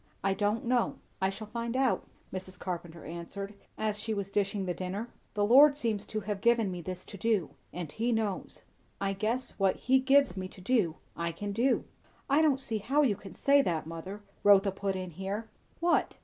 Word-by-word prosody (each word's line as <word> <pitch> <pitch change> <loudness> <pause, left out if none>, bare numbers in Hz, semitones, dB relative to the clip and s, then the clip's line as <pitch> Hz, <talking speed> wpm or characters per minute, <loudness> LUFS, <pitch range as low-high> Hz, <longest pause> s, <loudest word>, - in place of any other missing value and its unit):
"I 195 0 +3
don't 210 +3 0
know. 240 0 +2 0.3
I 190 - +3
shall 205 +3 -6
find 235 +3 -3
out," 265 -2 +1 0.3
Mrs. 185 0 -6
Carpenter 170 -3 -5
answered 175 +5 -6 0.2
as 215 -1 -1
she 220 +1 -2
was 200 -1 -3
dishing 200 -1 0
the 180 - -1
dinner. 190 +6 -4 0.3
"The 205 -1 +2
Lord 280 +6 +8
seems 225 -7 -1
to 215 - -3
have 200 -1 -3
given 230 -4 +3
me 180 -1 -5
this 185 +2 -4
to 200 - -9
do; 215 -7 +1 0.2
and 170 -4 -5
he 230 +6 0
knows. 220 -4 -2 0.4
I 195 0 0
guess, 225 +6 -1
what 195 -1 +3
he 265 +1 +3
gives 270 -5 +4
me 185 -1 -4
to 185 - -14
do, 185 -5 +2 0.2
I 170 0 -1
can 205 +4 -5
do." 240 +6 +2 0.5
"I 290 +3 +6
don't 290 -4 +4
see 225 -5 -2
how 270 +8 +2
you 230 -8 +3
can 195 0 -11
say 280 0 +5
that, 165 - -1
mother," 175 +6 -7 0.2
Rotha 200 -1 +6
put 195 0 -2
in 185 -1 -4
here. 195 +6 -4 0.3
"What?" 340 0 +2
205 Hz, 200 wpm, -30 LUFS, 190-235 Hz, 0.5 s, Lord